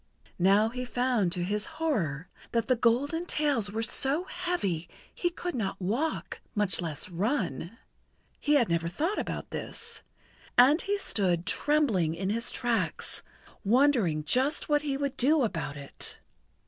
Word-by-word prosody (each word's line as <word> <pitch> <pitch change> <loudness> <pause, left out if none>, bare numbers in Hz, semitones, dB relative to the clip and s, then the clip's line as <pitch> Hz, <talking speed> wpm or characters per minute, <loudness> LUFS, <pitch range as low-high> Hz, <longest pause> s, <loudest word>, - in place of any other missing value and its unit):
Now 200 +4 +4
he 250 +2 -4
found 245 -6 +1
to 175 - -2
his 210 +3 -1
horror 180 - -1 0.3
that 230 -1 +1
his 255 -3 +2
golden 285 +9 +2
tails 280 - +1
were 225 +2 -2
so 275 +8 +2
heavy 345 - -2 0.2
he 350 - 0
could 355 +1 -5
not 215 -7 -2
walk, 235 - -2
much 195 -5 +2
less 160 -4 -3
run. 185 - -2 0.6
He 295 0 +2
had 250 -6 +4
never 170 0 0
thought 320 - -1
about - - -4
this, - - -5 0.6
and 275 +7 +7
he 405 +1 0
stood 180 - +1
trembling 210 - +2
in 190 +3 -2
his 230 +2 0
tracks, 240 -2 -1 0.4
wondering 225 - +3
just 260 - +1
what 295 -1 +3
he 280 -2 -2
would 280 -1 -2
do 290 +3 +4
about 165 -9 -2
it. 140 -1 -3
230 Hz, 150 wpm, -29 LUFS, 180-290 Hz, 0.6 s, and